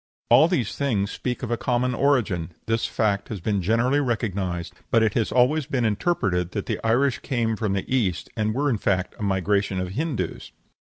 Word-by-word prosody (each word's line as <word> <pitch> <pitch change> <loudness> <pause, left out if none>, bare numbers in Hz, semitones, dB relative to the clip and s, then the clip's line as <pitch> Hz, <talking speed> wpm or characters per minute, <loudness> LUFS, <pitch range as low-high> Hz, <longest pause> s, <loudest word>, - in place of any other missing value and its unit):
All 155 - +7
these 145 - -1
things 110 -8 0
speak 125 0 -4
of 120 - -3
a 120 - +1
common 125 +3 0
origin; 110 - +1
this 115 0 0
fact 100 -2 0
has 110 - -4
been 100 +2 -1
generally 115 +9 +2
recognized, 100 - -2 0.2
but 115 - +4
it 110 -2 +2
has 115 - 0
always 130 +4 +3
been 130 -5 0
interpreted 100 - 0
that - - -3
the - - -2
Irish 120 +4 +2
came 115 -4 -1
from 105 -2 -1
the 100 - -2
East, 95 -9 0
and 110 0 -1
were 145 +2 +1
in 120 -7 +1
fact 95 -2 0
a - - -8
migration 100 0 0
of 90 0 -3
Hindoos. 125 - -3
110 Hz, 195 wpm, -24 LUFS, 100-125 Hz, 0.2 s, All